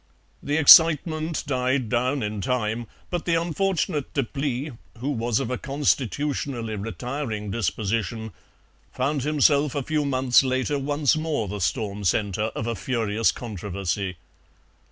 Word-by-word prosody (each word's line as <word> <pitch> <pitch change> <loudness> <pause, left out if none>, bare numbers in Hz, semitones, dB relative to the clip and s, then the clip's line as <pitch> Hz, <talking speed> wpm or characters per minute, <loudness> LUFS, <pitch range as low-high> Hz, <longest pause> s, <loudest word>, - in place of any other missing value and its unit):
"The 145 +2 -1
excitement 160 +1 +6
died 130 -2 0
down 125 +4 0
in 105 -1 -3
time, 115 0 -1 0.2
but 175 -2 -2
the 170 - +2
unfortunate 170 -4 -1
Deplis, 140 +1 -2 0.3
who 130 +5 -3
was 115 -3 0
of 120 - -3
a 125 - -2
constitutionally 135 -3 -1
retiring 115 0 -4
disposition, 110 +1 -2 0.6
found 140 +2 -1
himself 145 0 +2
a 140 - -1
few 155 +2 0
months 130 -3 +4
later, 130 +2 0
once 145 0 +1
more 155 -8 -1
the 100 +1 -5
storm 105 +2 -2
centre 105 +2 0
of 110 - -3
a 115 - -1
furious 115 -3 0
controversy. 100 -3 -4
125 Hz, 130 wpm, -24 LUFS, 110-145 Hz, 0.6 s, excitement